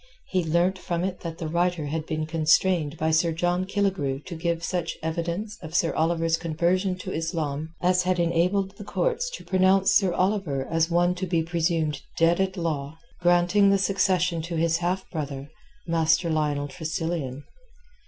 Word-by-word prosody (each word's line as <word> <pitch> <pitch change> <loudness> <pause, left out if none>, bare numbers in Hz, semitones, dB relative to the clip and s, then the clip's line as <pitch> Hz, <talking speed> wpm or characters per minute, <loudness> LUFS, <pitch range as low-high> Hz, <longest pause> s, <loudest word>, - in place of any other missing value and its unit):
He 185 -2 +1
learnt 170 +4 +1
from 175 -1 -2
it 185 -1 -3
that 165 -1 -6
the 165 - -4
writer 170 -1 0
had 155 +2 -3
been 155 -1 -2
constrained 160 0 +2
by 160 +1 0
Sir 165 +1 +3
John 175 +2 0
Killigrew 190 -9 -1
to 180 - -7
give 170 0 -2
such 175 -1 -2
evidence 170 +6 -3
of 160 -1 -8
Sir 165 -2 +2
Oliver's 165 0 +1
conversion 175 +3 0
to 185 - -6
Islam 160 -1 -3
as 180 0 +4
had 180 0 0
enabled 180 +4 +1
the - - -8
courts - - -1
to - - -9
pronounce 190 +1 +3
Sir 195 -2 +4
Oliver 180 -8 0
as 165 +1 +1
one 175 +1 +3
to 185 +1 -4
be 170 -2 +1
presumed 165 -3 0 0.2
dead 170 +2 +3
at 190 0 -1
law, 155 -3 -3 0.2
granting 175 +3 +4
the 195 - +4
succession 185 -3 +1
to 170 +1 -5
his 165 0 +2
half 180 +2 -2
brother, 145 -3 -5 0.3
Master 165 0 +2
Lionel 150 -2 0
Tressilian. 160 -3 -4
170 Hz, 170 wpm, -25 LUFS, 160-185 Hz, 0.3 s, as